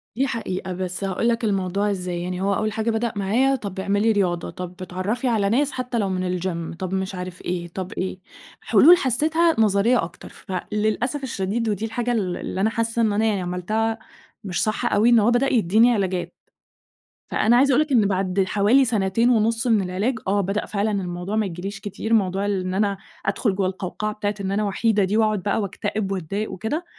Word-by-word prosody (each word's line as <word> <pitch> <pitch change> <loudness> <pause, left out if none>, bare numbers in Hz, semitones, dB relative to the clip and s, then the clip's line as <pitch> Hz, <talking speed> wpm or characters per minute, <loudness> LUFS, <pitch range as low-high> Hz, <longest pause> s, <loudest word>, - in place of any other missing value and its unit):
دي 270 +3 +1
حقيقة 190 -6 -4
بس 185 +1 -4
هاقول 195 +5 0
لك 230 0 0
الموضوع 200 0 0
إزاي؛ 180 -1 -5
يعني 180 +1 -4
هو 200 +1 +1
أول 215 0 -1
حاجة 220 +2 -1
بدأ 225 0 -1
معايا 235 +8 +2
طَب 200 -5 -6
اعملي 205 +3 +2
رياضة، 180 -5 0
طَب 180 -1 -7
اتعرَّفي 190 +8 -2
على 210 -4 +2
ناس 275 +5 +2
حتى 250 -1 -3
لو 200 -2 0
من 185 -1 -1
الGym 170 -2 -4
طَب 185 0 -4
مش 190 0 -2
عارف 180 0 -7
إيه، 175 -1 -3
طَب 185 +2 -6
إيه، 185 0 -4 0.4
حلول 345 +4 +7
حسيتها 315 +6 +2
نظرية 215 +2 +3
أكتر، 165 +1 -9
فللأسف 215 +9 -2
الشديد 220 -1 -2
ودي 210 +2 -1
الحاجة 240 +2 -2
ال 190 -6 -1
اللي 190 - -4
أنا 220 - +3
حاسة 230 +1 -1
إن 215 -2 +2
أنا 220 +2 +1
يعني 205 -4 +1
عملتها 215 +6 -1 0.4
مش 180 -4 -1
صح 215 0 0
أوي، 215 +4 +4
إن 235 -2 +6
هو 225 +3 +3
بدأ 265 +3 +2
يديني 225 +2 +4
علاجات. 190 -4 -1 1.0
فأنا 235 +3 +3
عايزة 275 +2 +4
أقول 275 +4 +4
لك 305 -2 -2
إن 220 -6 +4
بعد 190 0 +1
حوالي 215 +8 +4
سنتين 225 +1 +1
ونُص 230 0 +2
من 220 -4 +4
العلاج، 200 +6 -1
آه 200 +1 +2
بدأ 200 +2 -2
فعلًا 210 +1 -1
الموضوع 180 +1 -3
ما 220 -1 +1
ييجيليش 195 +3 -5
كتير، 210 +3 -4
موضوع 195 -2 +2
اللي 200 -2 0
إن 185 - -2
أنا 200 0 +1 0.3
أدخل 195 0 0
جوّا 190 -1 +1
القوقعة 195 +3 -4
بتاعة 205 -1 -2
إن 190 0 -2
أنا 210 +2 0
وحيدة 210 +1 +1
دي 195 +3 +1
وأقعد 215 -4 +1
بقى 205 +1 0
وأكتئب 205 0 -3
وأتضايق 195 +3 -3
وكده. 295 - -3
205 Hz, 200 wpm, -23 LUFS, 190-225 Hz, 1.0 s, حلول